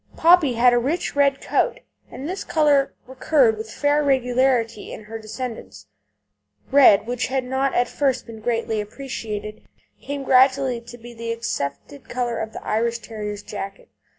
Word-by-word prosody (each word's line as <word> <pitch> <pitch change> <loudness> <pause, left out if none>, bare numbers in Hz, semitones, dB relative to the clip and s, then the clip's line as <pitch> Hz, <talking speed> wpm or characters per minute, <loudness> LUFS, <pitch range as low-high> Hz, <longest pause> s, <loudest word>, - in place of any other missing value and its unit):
Poppy 330 -5 +5
had 245 +1 +4
a 240 - +4
rich 290 +8 -2
red 280 -1 +2
coat, - - 0 0.3
and 275 - -7
this 375 +3 -4
colour 295 -3 +2
recurred 260 -2 +2
with 220 +1 -7
fair 290 +3 +1
regularity 250 -4 +1
in - - -8
her 225 +2 -8
descendants. 215 - -7 0.9
Red, 260 -8 +6
which 245 0 -2
had 260 0 -1
not 265 +2 -1
at 245 0 +2
first 270 -2 -1
been 225 -2 -10
greatly 225 -1 -1
appreciated, 215 -2 -6 0.4
came 280 0 -5
gradually 260 -1 +3
to 240 +1 -12
be 240 +1 -12
the 230 0 -5
accepted 230 - -5
colour 245 -2 -2
of 220 - -3
an - - -6
Irish 230 +2 0
Terrier's 210 -3 -6
jacket. 195 -1 -7
245 Hz, 155 wpm, -22 LUFS, 225-275 Hz, 0.9 s, Red